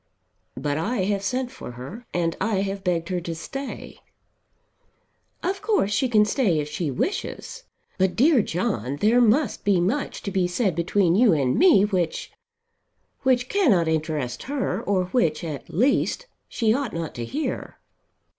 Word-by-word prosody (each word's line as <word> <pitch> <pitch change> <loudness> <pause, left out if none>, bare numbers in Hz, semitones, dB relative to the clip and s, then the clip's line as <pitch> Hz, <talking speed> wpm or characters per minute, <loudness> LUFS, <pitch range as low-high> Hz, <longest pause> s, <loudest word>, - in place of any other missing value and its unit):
"But 145 0 -1
I 205 +4 -1
have 200 +1 0
sent 250 +4 -2
for 260 - -9
her, 135 - -9
and 170 -1 0
I 195 -1 +1
have 195 0 -3
begged 170 -2 -1
her 180 -1 -1
to 170 -1 -5
stay." 275 +11 -7 1.4
"Of 385 +2 -1
course 415 - +1
she 250 +5 +1
can 215 -3 +5
stay 210 - +1
if 150 - -2
she 150 +1 -3
wishes. 400 - -3 0.3
But, 190 -1 +2
dear 275 0 +5
John, 135 - -2
there 220 +10 +3
must 245 +5 +2
be 200 -3 +3
much 220 +12 -1
to 200 - -3
be 185 -2 +1
said 190 +1 0
between 170 +1 +2
you 215 0 +5
and 135 -5 +1
me 330 - +6
which, 185 -5 -2 0.9
which 255 -1 +2
cannot 250 - +3
interest 155 -6 -2
her; 280 -2 -1
or 190 -2 0
which, 165 -10 +1
at 155 -4 -6
least, 270 - +1 0.2
she 220 -3 +1
ought 270 -2 -2
not 165 -2 -4
to 120 - -5
hear." 295 - -4
195 Hz, 160 wpm, -24 LUFS, 165-250 Hz, 1.4 s, me